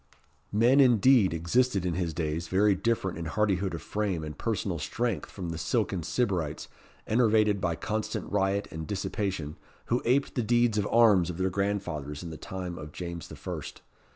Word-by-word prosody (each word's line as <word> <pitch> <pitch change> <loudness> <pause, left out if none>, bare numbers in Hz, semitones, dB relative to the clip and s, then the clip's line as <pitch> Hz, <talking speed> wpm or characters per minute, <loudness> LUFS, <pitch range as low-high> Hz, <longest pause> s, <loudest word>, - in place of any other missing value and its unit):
Men 120 +6 +4
indeed, 125 -4 +5
existed 95 +5 +1
in 90 - 0
his 85 -1 -1
days, 80 +1 -2
very 100 +2 +3
different 95 -3 -1
in 85 - -4
hardihood 95 0 0
of 80 - -7
frame 100 -6 -2
and 75 0 -6
personal 100 -6 -2
strength 120 +10 -2
from 90 -4 -6
the 80 -1 -4
silken 95 +2 0
sybarites, 85 -6 -1 0.4
enervated 110 -3 +3
by 85 -2 0
constant 110 +5 -3
riot 100 0 +1
and 80 -1 -6
dissipation, 95 -5 -3 0.4
who 120 - +2
aped 130 +4 +2
the 125 - 0
deeds 120 -1 +2
of 105 - 0
arms 105 -7 +5
of 85 - -5
their 95 0 0
grandfathers 90 -7 -2
in 85 - -6
the - - -6
time 90 -4 -6
of 75 -1 -8
James 85 -1 -6
the - - -10
First. - - -7
95 Hz, 175 wpm, -28 LUFS, 85-110 Hz, 0.4 s, indeed